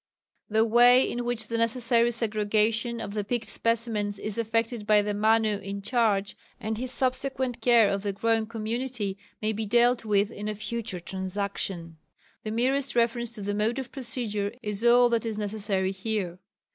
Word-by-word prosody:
The 220 +1 +3
way 245 +3 +6
in 240 0 -3
which 235 -3 -2
the 230 0 -2
necessary 235 0 +3
segregation 220 +1 0
of 200 - -5
the 210 -1 -2
picked 230 +2 -2
specimens 215 -2 -1
is 210 +1 -5
effected 230 -1 -1
by 210 -1 +5
the 210 0 -2
Manu 215 0 +2
in 200 0 -6
charge, 210 -4 +1 0.2
and 220 +1 -3
his 250 +3 -4
subsequent 260 -1 -1
care 235 -2 +5
of 200 0 -1
the 200 0 -2
growing 225 +2 0
community, 225 -1 -3 0.3
may 215 +1 +1
be 220 0 -3
dealt 240 +2 +3
with 205 0 +1
in 210 -1 -6
a 215 - -2
future 220 -2 -4
Transaction. 190 -2 -4 0.5
The 215 - -4
merest 255 +4 +1
reference 235 0 +1
to 210 -4 -6
the 205 +1 -2
mode 215 +4 0
of 265 -1 -5
procedure 230 -6 -2
is 210 0 -2
all 245 +1 +6
that 230 -2 +1
is 225 -2 -3
necessary 200 -2 -1
here. 190 -3 -3
220 Hz, 170 wpm, -27 LUFS, 205-235 Hz, 0.5 s, way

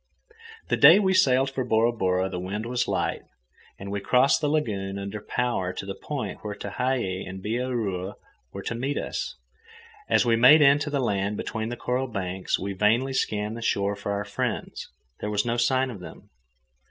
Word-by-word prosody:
The - - +2
day 155 +6 +9
we 190 -2 +2
sailed 135 -6 +3
for 135 -1 -2
Bora 115 0 +2
Bora 95 -4 0
the 95 -2 -5
wind 100 +5 -4
was 120 +1 -1
light, - - -1 0.6
and 100 0 -7
we 100 - -2
crossed 125 +8 +3
the 150 - +1
lagoon 100 -10 -1
under 100 +1 -5
power 120 -6 -1
to 95 - -6
the 95 - -4
point 145 +5 -5
where 105 -1 -5
Tehei 100 -2 -2
and 95 +1 -7
Bihaura 110 -5 -2 0.4
were - - -7
to - - -3
meet 135 +5 -2
us. - - -4 0.7
As - - +4
we 115 -1 +3
made 130 +7 +7
in 140 +1 +6
to 150 - -3
the 145 -1 -1
land 100 -4 -1
between 110 0 -3
the 120 - -5
coral 125 +2 -1
banks, 95 -4 -2
we 100 +1 -4
vainly 115 +7 +2
scanned 105 -3 -1
the 115 - -7
shore 100 -2 0
for 100 - -4
our 100 0 -2
friends. 100 - -4 0.3
There 105 - -3
was 105 +1 0
no 120 0 0
sign 130 +2 +2
of 105 - -9
them. 85 -3 -12
110 Hz, 190 wpm, -26 LUFS, 100-130 Hz, 0.7 s, day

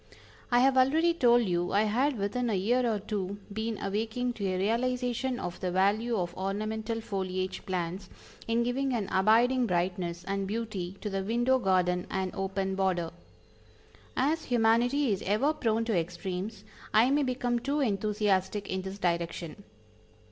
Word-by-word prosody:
I 245 -1 +4
have 265 0 +4
already 320 +6 +4
told 240 -6 +4
you 175 -2 -1
I 205 +2 +4
had 250 +6 +1
within 215 +5 -1
a 215 - +1
year 235 +5 +2
or 215 - 0
two 200 -1 -4 0.2
been 220 +1 -2
awaking 225 +5 -2
to 200 -4 -3
a 185 -1 -1
realization 245 +4 0
of 175 - -5
the 185 - -2
value 205 +6 +2
of 175 -2 -2
ornamental 215 +4 -2
foliage 185 -3 -3
plants 180 +1 -3 0.4
in 230 +1 +2
giving 260 +2 0
an 210 -4 -2
abiding 235 +6 +4
brightness 175 -1 -1
and 195 +1 -2
beauty 200 -4 -4
to 210 - -3
the 195 0 -1
window 240 +5 +2
garden 180 -4 +1
and 190 -1 -2
open 195 0 -2
border. 185 -3 0 1.1
As 305 +5 +1
humanity 245 +3 +3
is 195 - -1
ever 235 +10 +1
prone 225 -5 0
to 225 -3 0
extremes 180 +4 -3 0.3
I 235 +5 +5
may 290 +1 +3
become 250 -2 0
too 280 +5 -1
enthusiastic 205 -4 0
in 190 0 -1
this 190 +1 -6
direction. 170 0 -2
210 Hz, 155 wpm, -29 LUFS, 190-240 Hz, 1.1 s, I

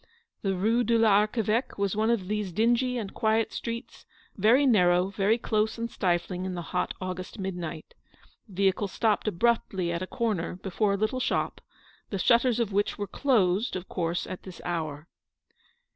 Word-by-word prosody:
The 195 -2 0
Rue 225 +6 +2
de 230 +1 +2
l'Archeveque 215 +2 +2
was 200 -1 0
one 220 +1 +1
of 220 -6 0
these 210 -2 -2
dingy 240 +6 +2
and 210 -5 -5
quiet 220 0 +1
streets, 235 +1 -6 0.3
very 230 +8 +4
narrow, 180 -6 +4
very 200 +3 +2
close 220 -1 0
and 230 0 -4
stifling 180 0 -1
in 185 -1 -3
the 175 - -4
hot 180 - -1
August 185 +1 -5
midnight. 175 -5 -5 0.5
The 195 - -14
vehicle 195 +1 +2
stopped 215 +2 0
abruptly 195 -3 +1
at 170 0 -2
a 185 - -3
corner, 210 -9 -2
before 195 +2 -1
a - - 0
little 215 +5 0
shop, - - -1 0.5
the 200 - -2
shutters 235 +4 +3
of 220 -4 -1
which 205 +1 0
were 205 - -2
closed, 210 -5 +1
of 185 0 -5
course, 170 -1 -2
at 185 - -7
this 185 -2 -11
hour. 155 -3 -3
200 Hz, 170 wpm, -27 LUFS, 185-230 Hz, 0.5 s, very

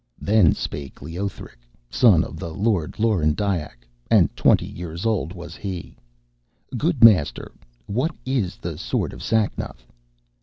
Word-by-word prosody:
Then 100 -7 +4
spake 70 -2 -6
Leothric, 85 -5 -6 0.3
son 110 - +5
of - - -8
the 85 -3 -5
Lord 95 -2 -1
Lorendiac, 85 - 0 0.2
and - - +4
twenty - - +3
years 85 +1 -7
old 110 -7 0
was 85 -2 -9
he: 95 -4 -6 0.8
'Good 145 0 +1
Master, 95 -11 +5 0.3
what 125 +10 0
of 130 - -3
the - - -5
sword - - -2
Sacnoth?' 105 - -1
95 Hz, 120 wpm, -23 LUFS, 80-110 Hz, 0.8 s, son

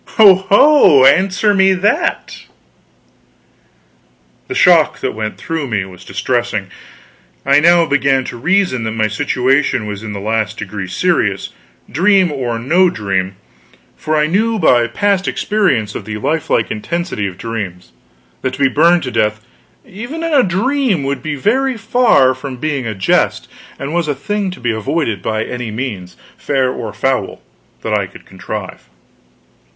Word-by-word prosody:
Ho 210 -3 +9
ho 190 - +5
answer 190 +8 +3
me 190 -1 +4
that!" 200 +4 -1 2.0
The 385 - -5
shock 175 - +4
that 130 - -2
went 110 0 -5
through 160 -4 -4
me 105 -5 -2
was 90 -1 -13
distressing. 105 0 -2 0.8
I 140 +1 +5
now 170 +2 +5
began 140 -3 +1
to 125 - -7
reason 165 - 0
that 110 - -3
my 110 -1 0
situation 125 +3 0
was 105 -1 -6
in 110 -1 -6
the 100 - -5
last 110 +2 -2
degree 100 -2 -6
serious, 90 0 0 0.4
dream 185 - +2
or 125 -5 -3
no 170 +10 +3
dream; 95 - -2 0.6
for 155 - -2
I 150 - +3
knew 220 +8 0
by 120 - +3
past 195 +10 0
experience 180 - 0
of - - -7
the 110 0 -5
lifelike 145 -2 -1
intensity 165 - -3
of 90 -2 -8
dreams, 95 - -6 0.5
that 130 -1 -2
to - - -15
be 135 -1 +3
burned 170 +5 +3
to 125 - -4
death, 105 -1 0 0.5
even 240 - -7
in 330 -1 -2
a 280 - +6
dream, 220 - 0
would 135 -1 -3
be 155 +1 -4
very 255 - 0
far 225 - +3
from 130 0 -8
being 140 -3 -3
a 110 - -4
jest, 95 -1 0 0.3
and 140 +3 -5
was 170 -2 0
a 145 - -1
thing 205 +7 -3
to 180 - -9
be 120 -1 -1
avoided, 115 0 -2
by 110 0 -2
any 125 -1 -5
means, 105 -6 -6 0.2
fair 135 -3 0
or 115 -4 -5
foul, 125 0 -2 0.4
that - - -2
I - - 0
could - - -16
contrive. 95 - -8
135 Hz, 155 wpm, -16 LUFS, 110-185 Hz, 2.0 s, Ho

